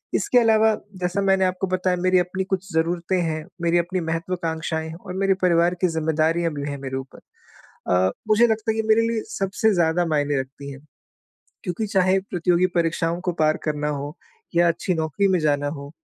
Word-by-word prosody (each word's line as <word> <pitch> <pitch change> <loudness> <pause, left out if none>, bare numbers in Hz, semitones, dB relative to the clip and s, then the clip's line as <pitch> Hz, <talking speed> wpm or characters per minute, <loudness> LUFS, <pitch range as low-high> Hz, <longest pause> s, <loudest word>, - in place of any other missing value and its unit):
इसके 250 - +3
अलावा 220 -1 +4 0.3
जैसा 180 +3 0
मैंने 190 -1 +3
आपको 185 +1 -1
बताया 185 0 0
मेरी 185 0 +4
अपनी 180 +2 -2
कुछ 190 0 -3
ज़रूरतें 170 +3 0
हैं, 155 -1 -2 0.2
मेरी 170 0 +2
अपनी 180 +2 -2
महत्वाकांक्षाएँ 165 -1 -3
हैं 160 - -8
और 180 - -6
मेरे 195 0 +4
परिवार 170 0 +3
की - - +6
ज़िम्मेदारियाँ 160 +1 0
भी 145 0 -4
हैं 140 - -5
मेरे 130 -1 -4
ऊपर। 135 0 -9 0.8
अ, 95 +1 +3 0.2
मुझे 230 +3 +5
लगता 220 0 0
है - - -3
कि 220 - -7
मेरे 225 +1 +4
लिए 225 -2 -1 0.2
सबसे 200 +2 +1
ज़्यादा 170 0 +2
मायने 145 -3 0
रखती 140 +2 -10
है। 135 - -10 0.9
क्योंकि 180 +5 -2
चाहे 190 -1 +2
प्रतियोगी 180 -1 +1
परीक्षाओं 170 0 0
को 180 -1 -2
पार 155 0 +3
करना 150 -1 -1
हो 145 +2 -4 0.4
या 170 0 +4
अच्छी 175 +2 -1
नौकरी 160 +5 0
में 185 -1 +2
जाना 145 -1 +1
हो, 140 -1 -7
175 Hz, 185 wpm, -23 LUFS, 155-190 Hz, 0.9 s, की